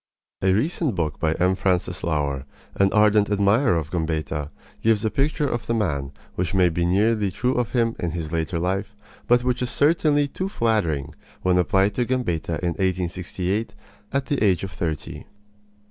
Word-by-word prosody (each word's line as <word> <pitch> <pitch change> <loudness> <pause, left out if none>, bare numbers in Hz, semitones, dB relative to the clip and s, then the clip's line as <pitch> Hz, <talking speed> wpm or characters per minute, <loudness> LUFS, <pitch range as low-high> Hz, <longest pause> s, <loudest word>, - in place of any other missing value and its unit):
A 95 - +3
recent 140 - 0
book 80 -4 -2
by 80 -1 +1
M. 90 +3 +2
Francis 90 -2 0
Laur, 70 -4 -1 0.3
an 100 0 +2
ardent 105 -1 +4
admirer 100 +1 +3
of 75 -2 -4
Gambetta, 80 -3 -2 0.3
gives 110 -1 +2
a 110 - +1
picture 145 +1 0
of 120 -3 -3
the 115 - +1
man 70 -11 -1 0.2
which 90 0 -2
may 90 -2 +5
be 85 +1 0
nearly 105 +2 +2
true 125 +7 0
of 125 -2 -1
him 115 -2 +1
in 85 - -1
his 80 -1 -4
later 85 +1 -1
life, 95 +4 -2 0.3
but 120 0 +4
which 125 0 0
is 125 - -1
certainly 145 0 +3
too 185 +7 -4
flattering 85 - 0 0.3
when 90 -1 +3
applied 95 +2 +2
to 120 +3 0
Gambetta 90 -10 -1
in 90 - +2
1868, 95 +3 -2 0.4
at 140 -1 0
the 145 -6 0
age 95 -4 +3
of 95 - -4
thirty. 80 -1 -4
95 Hz, 175 wpm, -23 LUFS, 85-115 Hz, 0.4 s, may